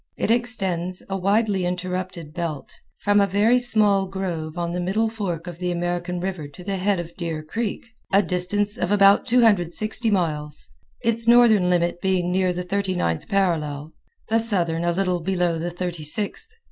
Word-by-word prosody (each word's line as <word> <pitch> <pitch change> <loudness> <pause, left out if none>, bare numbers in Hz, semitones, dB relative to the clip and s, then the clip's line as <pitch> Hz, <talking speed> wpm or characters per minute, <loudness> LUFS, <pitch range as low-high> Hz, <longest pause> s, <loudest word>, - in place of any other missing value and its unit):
It - - 0
extends, 190 -7 -1
a - - 0
widely 200 0 +1
interrupted 180 -2 -4
belt, 165 -4 -5 0.3
from 205 0 +4
a 200 - +3
very 210 +6 +3
small 210 -5 +2
grove 175 -4 -4
on 170 -1 -2
the 180 - -3
middle 205 +5 0
fork 185 -7 -4
of 175 -1 -8
the 180 -1 -1
American 175 0 -2
River 180 -5 -4
to 145 +6 -13
the 195 +1 -2
head 195 0 +1
of 170 0 -7
Deer 165 -4 -4
Creek, 220 +9 -4 0.3
a 200 +1 +5
distance 190 +4 -1
of 180 - -1
about 200 -1 +5
260 220 -1 +2
miles, 150 -7 -2 0.4
its 230 0 +1
northern 230 -6 +6
limit 175 -1 +1
being 185 -2 +1
near 185 0 +2
the 180 0 -3
thirty 195 0 -1
ninth 85 - -1
parallel, 160 -6 -1 0.3
the 225 +1 +2
southern 175 -7 0
a 175 - +2
little 180 0 0
below 175 -1 0
the 170 +2 -2
thirty 175 -2 -5
sixth. 205 - -2
180 Hz, 170 wpm, -23 LUFS, 175-205 Hz, 0.4 s, northern